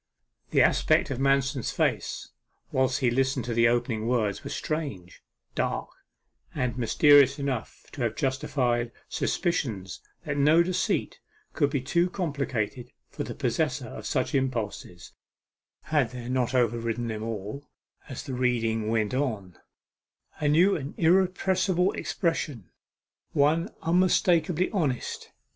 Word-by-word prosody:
The -, -, +4 dB
aspects -, -, +3 dB
of 130 Hz, -, -3 dB
Manston's 135 Hz, -1 st, +1 dB
face -, -, -1 dB, 0.4 s
whilst 130 Hz, +1 st, +1 dB
he 125 Hz, -2 st, +3 dB
listened 135 Hz, +1 st, 0 dB
to 120 Hz, -, -2 dB
the 115 Hz, 0 st, +4 dB
opening 115 Hz, -2 st, 0 dB
words 110 Hz, -5 st, 0 dB
were 140 Hz, -, -6 dB
strange, 140 Hz, -, -4 dB, 0.3 s
dark, -, -, -2 dB, 0.7 s
and 125 Hz, -1 st, -1 dB
mysterious 140 Hz, +3 st, +5 dB
enough 135 Hz, -5 st, -4 dB
to 135 Hz, -, -7 dB
have 115 Hz, -2 st, 0 dB
justified 130 Hz, -4 st, 0 dB, 0.2 s
suspicions 110 Hz, -, -2 dB, 0.2 s
that 145 Hz, -2 st, -2 dB
no 155 Hz, +4 st, +5 dB
deceit 180 Hz, +1 st, -1 dB, 0.3 s
could 145 Hz, -3 st, +2 dB
be 140 Hz, -2 st, -1 dB
too 170 Hz, +6 st, +1 dB
complicated 135 Hz, -, -3 dB, 0.2 s
for -, -, -4 dB
the -, -, -6 dB
possessor -, -, -1 dB
of -, -, -7 dB
such -, -, -1 dB
impulses, 115 Hz, -, -3 dB, 0.7 s
had 145 Hz, -6 st, +1 dB
there 125 Hz, 0 st, -7 dB
not 125 Hz, -1 st, 0 dB
overridden 115 Hz, -1 st, 0 dB
them 110 Hz, -1 st, -4 dB
all, 110 Hz, +5 st, -5 dB, 0.4 s
as 130 Hz, -, -6 dB
the 135 Hz, -, -6 dB
reading 115 Hz, -3 st, 0 dB
went 110 Hz, 0 st, 0 dB
on, 110 Hz, -10 st, -2 dB, 0.8 s
a 150 Hz, -, 0 dB
new 170 Hz, +7 st, +4 dB
and 140 Hz, -1 st, -5 dB
irrepressible 185 Hz, +1 st, +2 dB
expression 150 Hz, -, -2 dB, 0.6 s
one 150 Hz, +4 st, +2 dB
unmistakably 180 Hz, 0 st, +2 dB
honest. 150 Hz, -, -2 dB
130 Hz, 125 wpm, -27 LUFS, 115-150 Hz, 0.8 s, mysterious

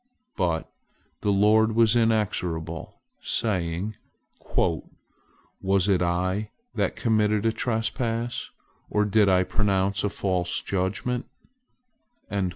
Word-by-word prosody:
But 85 Hz, -4 st, 0 dB, 0.5 s
the 105 Hz, -, -1 dB
Lord 110 Hz, +3 st, +4 dB
was 115 Hz, -1 st, +5 dB
inexorable, 90 Hz, -8 st, 0 dB, 0.3 s
saying, 95 Hz, 0 st, -1 dB, 0.6 s
"Was 95 Hz, +4 st, -2 dB
it 95 Hz, -3 st, +3 dB
I 95 Hz, +4 st, 0 dB, 0.2 s
that -, -, 0 dB
committed 105 Hz, -2 st, +1 dB
a 115 Hz, -, +4 dB
trespass, 115 Hz, +1 st, -2 dB, 0.4 s
or 105 Hz, 0 st, +2 dB
did 105 Hz, 0 st, +4 dB
I 95 Hz, 0 st, +4 dB
pronounce 100 Hz, 0 st, +1 dB
a 105 Hz, -, +1 dB
false 90 Hz, -3 st, -1 dB
judgment?" 100 Hz, +6 st, -2 dB
100 Hz, 95 wpm, -26 LUFS, 90-110 Hz, 0.6 s, was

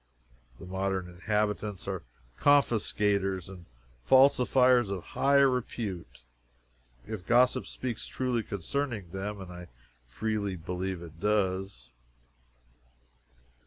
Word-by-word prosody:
The -, -, -11 dB
modern 95 Hz, 0 st, -2 dB
inhabitants 105 Hz, +2 st, -2 dB
are -, -, -3 dB, 0.4 s
confiscators 105 Hz, -, +2 dB
and 95 Hz, -3 st, -11 dB, 0.4 s
falsifiers 125 Hz, -, +5 dB
of 95 Hz, -3 st, -4 dB
high 140 Hz, +1 st, +2 dB
repute, 115 Hz, -, 0 dB, 0.8 s
if 105 Hz, -5 st, -7 dB
gossip 125 Hz, +1 st, +3 dB
speaks 125 Hz, -4 st, -5 dB
truly 125 Hz, -2 st, -1 dB
concerning 105 Hz, -, -3 dB
them, 100 Hz, +2 st, -4 dB
and 95 Hz, -2 st, -8 dB
I 90 Hz, 0 st, -9 dB, 0.4 s
freely 100 Hz, -, -2 dB
believe 90 Hz, +1 st, -4 dB
it 80 Hz, -1 st, -12 dB
does. 95 Hz, -, -1 dB
100 Hz, 95 wpm, -29 LUFS, 90-120 Hz, 0.8 s, falsifiers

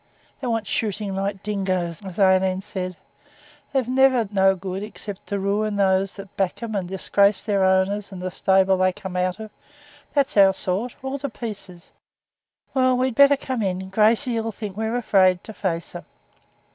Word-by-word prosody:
'"They 260 Hz, -, -4 dB
want 225 Hz, -2 st, -1 dB
shooting 205 Hz, -1 st, -2 dB
like 195 Hz, +1 st, -1 dB
the 195 Hz, -, -19 dB
dingoes," 185 Hz, -4 st, -2 dB
as 190 Hz, -2 st, -8 dB
Aileen 190 Hz, -1 st, +3 dB
said. 185 Hz, -3 st, -5 dB, 0.7 s
They're 265 Hz, -2 st, +1 dB
never 255 Hz, -2 st, +3 dB
no 195 Hz, -1 st, +4 dB
good, 190 Hz, +1 st, -5 dB
except 205 Hz, -1 st, -8 dB
to 200 Hz, -, -2 dB
ruin 205 Hz, +2 st, 0 dB
those 195 Hz, -1 st, +1 dB
that 195 Hz, -1 st, -11 dB
back 195 Hz, +4 st, -2 dB
'em 225 Hz, -1 st, -4 dB
and 190 Hz, -3 st, -2 dB
disgrace 200 Hz, +2 st, +2 dB
their 200 Hz, -2 st, +1 dB
owners 190 Hz, +2 st, +1 dB
and 190 Hz, -, -8 dB
the 185 Hz, 0 st, -4 dB
stable 190 Hz, 0 st, +3 dB
they 185 Hz, 0 st, +2 dB
come 185 Hz, 0 st, -8 dB
out 180 Hz, +2 st, -1 dB
of. 220 Hz, -1 st, -8 dB, 0.6 s
That's 280 Hz, -6 st, +1 dB
our 195 Hz, -1 st, +6 dB
sort, 200 Hz, +8 st, -2 dB
all 265 Hz, +1 st, -3 dB
to 280 Hz, +1 st, -3 dB
pieces. 200 Hz, -7 st, -7 dB, 0.8 s
Well, 255 Hz, -1 st, +3 dB
we'd 255 Hz, 0 st, 0 dB
better 280 Hz, +3 st, +6 dB
come 260 Hz, -3 st, -3 dB
in. 190 Hz, -1 st, -2 dB
Gracey 225 Hz, +4 st, +2 dB
'll 225 Hz, 0 st, -2 dB
think 205 Hz, -2 st, -7 dB
we're 220 Hz, +2 st, -1 dB
afraid 185 Hz, -6 st, +3 dB
to 220 Hz, -, -9 dB
face 170 Hz, -5 st, -3 dB
her.' -, -, -9 dB
200 Hz, 180 wpm, -23 LUFS, 190-225 Hz, 0.8 s, our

